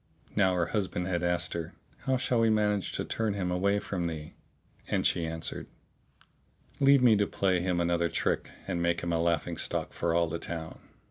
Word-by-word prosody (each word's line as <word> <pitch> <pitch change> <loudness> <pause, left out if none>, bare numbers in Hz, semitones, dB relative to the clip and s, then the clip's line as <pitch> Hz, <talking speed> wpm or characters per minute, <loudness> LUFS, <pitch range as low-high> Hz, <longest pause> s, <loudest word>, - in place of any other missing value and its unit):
Now 95 -3 +3
her 90 -1 +2
husband 95 -3 -2
had 90 -2 -1
asked 85 0 0
her, 85 -2 -5 0.3
"How 130 0 +3
shall 125 -1 +1
we 115 0 +4
manage 105 -2 +1
to - - -2
turn 110 -3 -1
him 90 -3 -1
away 100 +3 +2
from 90 -4 -2
thee?"; 80 -2 -6 0.5
and - - 0
she 85 -1 +2
answered, 80 0 -4 1.1
"Leave 140 -1 +6
me 115 -3 +7
to 100 0 +2
play 95 -2 +1
him 90 0 0
another 85 0 +1
trick - - -1 0.2
and 85 - -2
make 85 -1 +1
him 85 0 -1
a 85 - +1
laughing 85 -2 0
stock - - -2
for 85 -1 0
all 85 0 +3
the 80 +1 -4
town." 80 -1 -6
90 Hz, 195 wpm, -29 LUFS, 85-100 Hz, 1.1 s, me